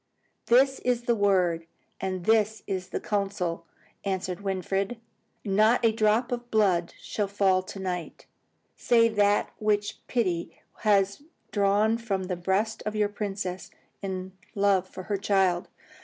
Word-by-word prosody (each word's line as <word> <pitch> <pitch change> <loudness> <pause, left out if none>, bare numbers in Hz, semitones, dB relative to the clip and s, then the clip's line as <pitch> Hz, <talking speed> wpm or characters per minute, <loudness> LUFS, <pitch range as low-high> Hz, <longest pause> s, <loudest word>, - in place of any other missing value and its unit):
"This 265 +3 +4
is 245 -1 0
the 240 - +2
word, 180 -6 +2 0.3
and 185 -2 -3
this 220 -1 +2
is 185 -1 -3
the - - -3
counsel," 195 -5 -2 0.4
answered 190 -1 -2
Winfried. 195 +3 -2 0.5
"Not 215 +4 +3
a 225 - +5
drop 220 +2 +2
of 240 0 -4
blood 190 -6 +2
shall 205 -2 -2
fall 195 -2 +2
to 195 +2 -9
night, 180 -3 -5 0.5
save 230 -2 +3
that 205 0 +3
which 210 -1 0
pity 180 -9 -1 0.2
has 200 0 +2 0.3
drawn 205 +2 +2
from 200 -5 -2
the 180 0 -3
breast 190 +5 -1
of 215 0 -3
your 210 -1 +2
princess, 195 -3 -4 0.3
in 190 -1 -4 0.2
love 195 -2 +2
for 185 - -8
her 205 +1 -1
child. 190 -3 +1
200 Hz, 140 wpm, -27 LUFS, 185-215 Hz, 0.5 s, a